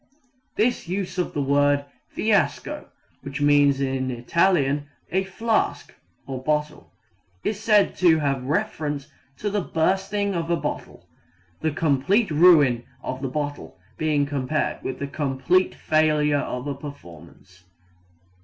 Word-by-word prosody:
This 235 -3 +1
use 185 +1 -3
of 180 - -2
the 145 - 0
word 145 +1 +2 0.2
fiasco 210 -5 0 0.3
(which 140 +1 -6
means 145 -1 +4
in 130 -1 -1
Italian 145 +2 +1 0.2
a 190 +3 +1
flask, 220 +3 -1 0.3
or 130 -2 -5
bottle) 150 +2 -2 0.5
is 210 -1 -2
said 210 -2 +3
to 170 -3 +5
have 140 -3 0
reference 150 -3 -2 0.3
to 205 - -3
the 205 0 0
bursting 195 +4 0
of 165 -2 -2
a 170 - +2
bottle, - - -6 0.5
the 160 - 0
complete 155 - +1
ruin 150 -7 +5 0.2
of 130 +1 -4
the 135 - -1
bottle 145 -3 -4 0.2
being 150 -2 +1
compared 145 +1 -2
with 130 - -4
the 140 - -3
complete 145 +6 0
failure 150 -2 +2
of 125 -1 -4
a 145 - -2
performance. 95 - -12
150 Hz, 130 wpm, -24 LUFS, 140-180 Hz, 0.5 s, to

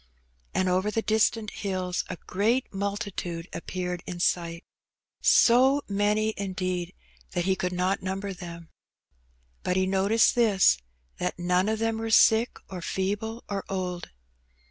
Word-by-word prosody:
And 185 - +2
over 185 +3 +1
the 225 +1 -1
distant 220 0 +1
bills 185 -2 -1
a - - -5
great 225 +7 0
multitude 195 -4 -3
appeared 180 -1 -4
in 175 -1 -5
sight 170 -1 0 0.4
— - - -66 0.2
so 265 +4 +5
many, 210 +2 +1
indeed, 185 -2 -3 0.4
that 175 -2 0
he 190 0 +2
could 180 -1 -2
not 180 +2 0
number 195 +1 -3
them. 170 -2 -9 0.9
But 180 - -1
he 190 0 +2
noticed 195 +4 +3
this, 205 - +4 0.4
that - - -2
none 180 +3 +1
of 220 - 0
them 225 0 -1
were 225 0 -3
sick, 225 +2 +5
or 185 -2 -7
feeble, 205 +6 -2
or 200 -1 -3
old. 180 -2 -3
190 Hz, 145 wpm, -27 LUFS, 180-215 Hz, 0.9 s, so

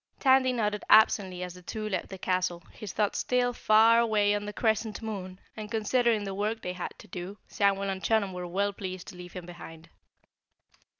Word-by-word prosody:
Tandy 260 -1 +4
nodded 210 -4 -1
absently 190 -4 +5
as 180 -1 -6
the 180 - -13
two 215 +4 -5
left 190 -4 -3
the 190 - -7
castle, 180 -2 -1
his 210 -4 -8
thoughts 210 -1 0
still 245 -1 +1
far 225 0 +5
away 210 -3 +3
on 205 0 -2
the - - -3
Crescent 220 -1 0
Moon, 190 -4 -6 0.2
and 215 -1 -7
considering 230 0 +1
the 195 -1 -4
work 215 +3 -2
they 180 - -3
had 180 -1 -6
to - - -14
do, 185 +2 -7
Samuel 200 -1 +1
and 190 0 -5
Chunum 210 -4 +1
were 180 -1 -5
well 200 +3 0
pleased 185 -2 -6
to 195 - -11
leave 180 0 -10
him 180 -2 -7
behind. 165 -1 -11
205 Hz, 195 wpm, -28 LUFS, 185-220 Hz, 0.2 s, absently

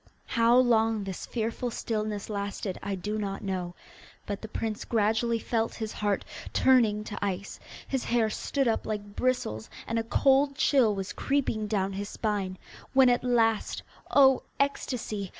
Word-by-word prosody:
How 235 0 +4
long 225 -4 +3
this 190 -2 -6
fearful 230 +1 -2
stillness 215 -3 -3
lasted 200 -2 -4
I 200 -1 -2
do 210 +4 -3
not 195 -2 -4
know, 180 -3 -3 0.5
but 200 -1 -4
the 220 - -6
prince 220 0 -3
gradually 225 +1 +1
felt 225 0 -1
his 220 -2 -4
heart 205 -1 -1 0.3
turning 230 -5 +4
to 205 -1 -6
ice, 195 0 -3 0.3
his 265 -2 -2
hair 235 -2 +2
stood 275 +3 -1
up 225 - 0
like 205 -1 -4
bristles, 180 - -1 0.2
and 230 0 -1
a - - -1
cold 275 +4 +3
chill 250 -7 +3
was 190 -1 -4
creeping 255 -6 0
down 195 -2 0
his 200 +1 -4
spine, 200 -4 -2 0.4
when 265 -1 +6
at 245 0 +2
last 225 -3 +1 0.3
oh, 265 -2 +6 0.2
ecstasy! 235 -7 -1
220 Hz, 155 wpm, -28 LUFS, 205-240 Hz, 0.5 s, when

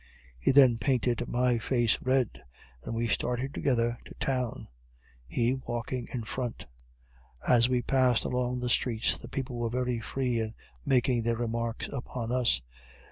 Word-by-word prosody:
He - - +1
then 130 -4 +6
painted 120 -2 +1
my 125 -1 +2
face 120 -1 +1
red, 130 -2 0 0.4
and 115 - -4
we 115 +1 0
started 125 +3 -1
together 120 -2 +1
to - - -12
town, 125 -3 -2 0.6
he 120 - +1
walking 120 -1 -4
in 120 -3 -3
front. 120 +1 -4 0.8
As 120 0 +5
we 125 -1 +1
passed 130 -3 +3
along 125 0 -1
the 125 - -1
streets 115 -3 +1
the - - -10
people 130 -2 -4
were 120 -1 0
very 125 0 -1
free 125 0 -1
in 110 0 -3 0.3
making 125 - +2
their 115 0 0
remarks 115 0 -2
upon 125 -3 -4
us. 120 - +2
120 Hz, 150 wpm, -29 LUFS, 115-125 Hz, 0.8 s, then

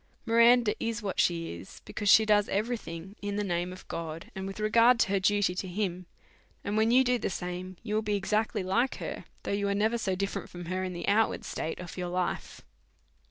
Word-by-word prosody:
Miranda 235 -1 +5
is 230 -1 -2
what 195 - -3
she 165 - +1
is, 85 +3 -11
because 205 -1 -2
she 220 +1 +8
does 210 -1 +3
every 220 +5 0
thing 170 -1 -8
in 205 0 -3
the 210 - 0
name, 175 -1 -1
and 170 +1 -6
with 195 +2 -7
regard 230 +3 +5
to - - +3
her 195 0 +2
duty 205 -1 +2
to 185 +1 -4
God; 185 -1 -2 0.6
and 205 - -2
when 220 +1 +3
you 255 +2 +6
do 250 -1 +1
the - - -1
same, 180 0 -5
you 210 -2 -4
will 215 - +2
be 210 -1 -1
exactly 210 +1 0
like 235 +8 +1
her, - - -6 0.2
though - - -3
you 200 0 0
are 200 - +1
never 220 +3 +1
so 190 -4 0
different 195 +1 -3
from 175 -1 -8
her 185 +2 -2
in 185 -1 -3
the 175 - -5
outward 220 +2 +2
state 160 - -4
of 180 0 -8
your 180 -1 -2
life. 180 0 -3
200 Hz, 215 wpm, -29 LUFS, 180-215 Hz, 0.6 s, she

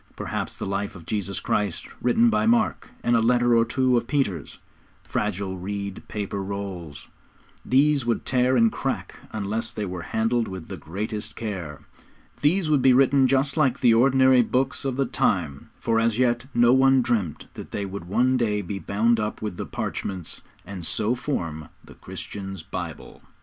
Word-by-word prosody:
Perhaps - - -4
the - - -4
life 100 +1 -3
of 85 -3 -11
Jesus 100 -2 -2
Christ, 100 -5 -1
written 230 - +4
by - - +2
Mark, 235 +1 +2
and 120 - +3
a - - +5
letter 120 +1 +3
or 115 - +5
two 125 +1 +2
of 120 - -1
Peter's; 125 - -1 0.5
fragile, 95 -2 -2
reed 100 +1 -4
paper 100 -1 -4
rolls, 95 -6 -6 0.6
which 140 +1 +3
would 115 -1 -1
tear 130 0 +2
and 115 -1 +4
crack - - -4
unless 110 +1 -2
they 105 - -4
were 90 -2 -5
handled 115 +5 0
with 95 -4 -8
the - - -5
greatest 105 +5 -5
care. 90 -10 -5 0.6
These 170 +4 +2
would 150 -3 +3
be 130 0 +6
written 135 +1 +5
just 135 +1 +2
like 135 -4 +2
the 120 -3 +6
ordinary 130 +1 +5
books 130 +4 -1
of 135 -2 -1
the 135 - +2
time, 80 - -1
for 115 -1 +1
as 115 -1 +1
yet 120 0 +1
no 120 0 +5
one 135 -1 +5
dreamt 110 -10 -1
that - - -9
they 100 - -3
would 95 -2 -6
one 125 +8 +2
day 105 -4 0
be 95 +2 -4
bound 110 +6 +1
up 105 0 -2
with 105 -4 -4
the - - -5
'parchments,' 95 -4 -5 0.2
and 95 -2 -7
so 110 +7 0
form 85 - -4 0.2
the - - -13
Christians' 95 -3 -8
Bible. - - -7
115 Hz, 175 wpm, -25 LUFS, 100-130 Hz, 0.6 s, be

